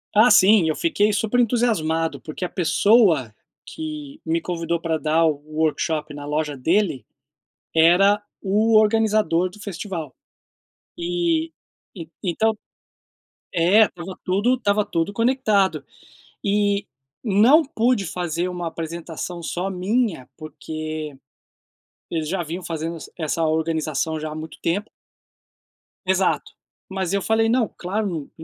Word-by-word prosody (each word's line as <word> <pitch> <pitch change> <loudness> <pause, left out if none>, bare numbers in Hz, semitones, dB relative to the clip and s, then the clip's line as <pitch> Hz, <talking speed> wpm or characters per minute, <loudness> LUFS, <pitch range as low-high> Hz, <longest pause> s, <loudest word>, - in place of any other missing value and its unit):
Ah 220 +4 +7
sim, 190 -6 +6
eu 155 - 0
fiquei 215 -11 +1
super 220 +3 0
entusiasmado, 205 -10 +1
porque 155 +4 -5
a - - -4
pessoa 175 - +3 0.3
que 300 - -7
me 165 +1 0
convidou 170 0 -2
pra 160 -1 -1
dar 160 +1 +2
o 155 -3 +1 0.2
workshop 155 -1 -1
na 145 0 -8
loja 150 0 -2
dele 160 - +1 0.7
era 180 +6 +5 0.2
o 215 +3 +2
organizador 215 -5 +3
do 195 - -15
festival. 185 -4 -5 0.8
E 340 -2 0 0.7
então 215 +4 +1 1.0
é, 180 +5 +5
estava 180 -2 -5
tudo 205 +7 +2
estava 210 -4 +1
tudo 165 +2 -2
conectado, 225 -4 +1 0.6
e 205 0 +1 0.4
não 240 +9 +5
pude 245 -6 +1
fazer 175 0 -2
uma 175 -1 -4
apresentação 170 +1 -6
só 180 +3 -3
minha, 190 - -1
porque 155 -1 -6 1.0
eles 160 -2 -2
já 180 +1 -1
vinham 170 +3 -6
fazendo 165 0 -4 0.2
essa 165 0 -2
organização 160 -1 -1
já 155 - -4
há 150 - -6
muito 155 0 -8
tempo. 200 +6 -1 1.2
Exato. 190 0 +1 0.4
Mas 190 -1 -2
eu 200 - +1
falei: 225 +2 +2
“Não, 235 -2 +1
claro, 180 -5 -3
180 Hz, 120 wpm, -22 LUFS, 160-215 Hz, 1.2 s, Ah